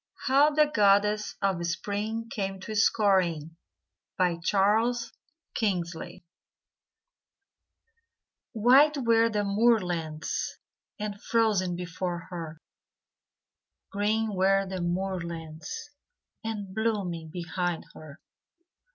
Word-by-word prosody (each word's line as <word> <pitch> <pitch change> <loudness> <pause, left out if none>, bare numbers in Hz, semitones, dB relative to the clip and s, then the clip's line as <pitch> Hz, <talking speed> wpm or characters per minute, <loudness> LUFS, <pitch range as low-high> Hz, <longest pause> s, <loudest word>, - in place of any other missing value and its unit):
HOW 280 +2 +5
THE 305 0 +4
GODDESS 210 -4 +2
OF 190 -3 +1
SPRING 205 +6 -3
CAME 195 -2 -3
TO 215 +3 -6
SCORING 185 -7 +2 0.9
Charles 225 +6 +1 0.4
Kingsley 175 -5 -2 2.3
White 265 +7 +5
were 230 -3 +3
the 210 -2 0
moorlands, 185 -7 0 0.4
And 205 -1 -5
frozen 210 -6 +1
before 175 0 -4
her; 165 -2 -6 1.3
Green 215 +2 0
were 195 +1 +3
the 190 -1 -5
moorlands, 170 - -4 0.5
And 210 -4 -5
blooming 195 -7 -2
behind 175 0 -3
her. 155 +1 -12
195 Hz, 80 wpm, -28 LUFS, 175-220 Hz, 2.3 s, HOW